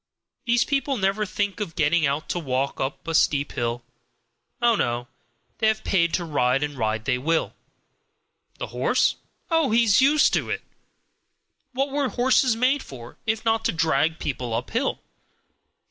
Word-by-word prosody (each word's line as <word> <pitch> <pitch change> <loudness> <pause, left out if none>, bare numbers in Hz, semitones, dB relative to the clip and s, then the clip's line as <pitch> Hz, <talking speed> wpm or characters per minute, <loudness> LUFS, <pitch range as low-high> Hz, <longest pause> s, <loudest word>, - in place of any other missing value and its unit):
These 240 0 +3
people 275 -1 0
never 200 +1 0
think 205 +2 -2
of 195 -6 -4
getting 155 0 +2
out 140 +3 -2
to 175 - -1
walk 135 -3 -2
up 135 +4 -4
a 165 - -2
steep 145 -2 +2
hill. 120 0 -3 0.8
Oh, 240 -1 +4
no, 120 - -1 0.5
they 220 - +2
have 220 0 +1
paid 170 -3 +2
to 175 - -2
ride, 135 -3 +1
and 145 -1 -3
ride 110 -2 -2
they 125 -2 +1
will! 160 +5 0 1.0
The - - -5
horse? - - +2 0.3
Oh, 325 -4 +3
he's 225 0 +4
used 295 +3 +4
to - - 0
it! - - -3 1.1
What 270 +2 -1
were 280 -2 0
horses 255 -1 +2
made 260 +4 +2
for, 120 -3 -11
if 220 +1 -1
not 225 0 +2
to - - +2
drag 160 -1 +1
people 125 -7 -3
uphill? 230 - -2
170 Hz, 160 wpm, -24 LUFS, -, 1.1 s, Oh